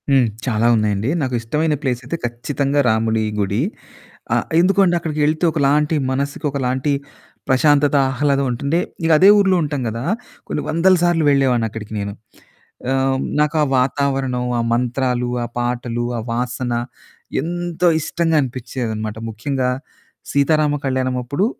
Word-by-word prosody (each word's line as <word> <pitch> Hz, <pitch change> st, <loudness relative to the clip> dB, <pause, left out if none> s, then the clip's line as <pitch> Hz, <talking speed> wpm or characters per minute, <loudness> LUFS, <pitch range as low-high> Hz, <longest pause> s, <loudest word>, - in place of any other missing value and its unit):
హ్మ్. 135 Hz, -3 st, +4 dB, 0.2 s
చాలా 115 Hz, -2 st, +1 dB
ఉన్నాయండి. 105 Hz, +1 st, 0 dB
నాకు 130 Hz, -2 st, -2 dB
ఇష్టమైన 150 Hz, +7 st, 0 dB
ప్లేస్ 130 Hz, -4 st, -1 dB
అయితే 150 Hz, +7 st, -3 dB
ఖచ్చితంగా 140 Hz, +4 st, -1 dB
రాముడి 110 Hz, 0 st, +1 dB, 0.2 s
గుడి. 100 Hz, +3 st, 0 dB, 0.7 s
ఆహ్, -, -, +1 dB
ఎందుకో 190 Hz, +3 st, +3 dB
అండి 175 Hz, -1 st, +2 dB
అక్కడికెళ్తే 155 Hz, 0 st, 0 dB
ఒకలాంటి 150 Hz, +1 st, +2 dB, 0.2 s
మనసుకి 140 Hz, +3 st, -2 dB
ఒకలాంటి 130 Hz, +1 st, -1 dB, 0.6 s
ప్రశాంతత, 145 Hz, +2 st, +4 dB, 0.2 s
ఆహ్లాదం 140 Hz, 0 st, +1 dB
ఉంటుంది. 140 Hz, +7 st, 0 dB, 0.3 s
ఇకదే 165 Hz, +4 st, +6 dB
ఊర్లో 195 Hz, -2 st, +4 dB
ఉంటాం 145 Hz, -2 st, -2 dB
గదా! 115 Hz, +2 st, -5 dB, 0.4 s
కొన్ని 150 Hz, -, -2 dB
వందల 170 Hz, +4 st, +4 dB
సార్లు 175 Hz, -2 st, +2 dB
వెళ్ళేవాడిని 130 Hz, -5 st, +2 dB
అక్కడికి 110 Hz, 0 st, -8 dB
నేను. 100 Hz, 0 st, -4 dB, 0.8 s
ఆహ్, 135 Hz, 0 st, +1 dB, 0.2 s
నాకా 150 Hz, +1 st, +1 dB, 0.2 s
వాతావరణం, 135 Hz, -1 st, 0 dB
ఆ -, -, +2 dB
మంత్రాలు, 125 Hz, 0 st, 0 dB, 0.2 s
ఆ -, -, -5 dB
పాటలు, 120 Hz, -1 st, -2 dB
ఆ -, -, -3 dB
వాసన 125 Hz, +1 st, -2 dB, 0.7 s
ఎంతో 175 Hz, +2 st, 0 dB
ఇష్టంగా 165 Hz, +1 st, 0 dB
అనిపించేదనమాట. 115 Hz, -4 st, -4 dB
ముఖ్యంగా 125 Hz, +3 st, -2 dB, 0.6 s
సీతారామ 150 Hz, +1 st, +2 dB
కళ్యాణం 130 Hz, -1 st, 0 dB
అప్పుడు 140 Hz, +10 st, 0 dB
135 Hz, 130 wpm, -19 LUFS, 120-150 Hz, 0.8 s, ఇకదే